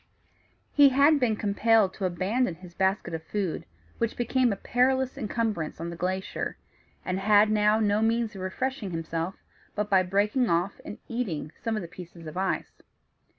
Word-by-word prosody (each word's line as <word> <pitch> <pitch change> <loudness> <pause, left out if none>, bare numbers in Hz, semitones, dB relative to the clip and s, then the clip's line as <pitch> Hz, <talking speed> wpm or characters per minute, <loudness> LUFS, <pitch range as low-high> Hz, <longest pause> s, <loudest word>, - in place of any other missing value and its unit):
He 285 -1 +7
had 285 +3 +5
been 235 -4 +2
compelled 210 -1 +2
to 195 - -3
abandon 185 +4 0
his 180 0 -13
basket 190 0 0
of 160 - -3
food, 190 0 -3 0.3
which 230 -1 -1
became 245 0 +2
a - - 0
perilous 260 +5 +1
incumbrance 220 - -2
on 170 +1 -4
the - - -6
glacier, 185 +2 -3 0.5
and 185 +1 -1
had 210 +1 +5
now 210 0 +3
no 210 -1 +2
means 225 0 +1
of 195 - -8
refreshing 220 +4 -3
himself 165 +1 -3 0.4
but 210 0 -2
by 190 -1 +6
breaking 205 +7 +1
off 175 +4 0
and 210 - -7
eating 195 -11 -3
some 225 -1 -3
of 215 - -3
the - - -6
pieces 170 -1 -11
of 155 - -8
ice. 190 +1 -2
205 Hz, 170 wpm, -27 LUFS, 185-230 Hz, 0.5 s, He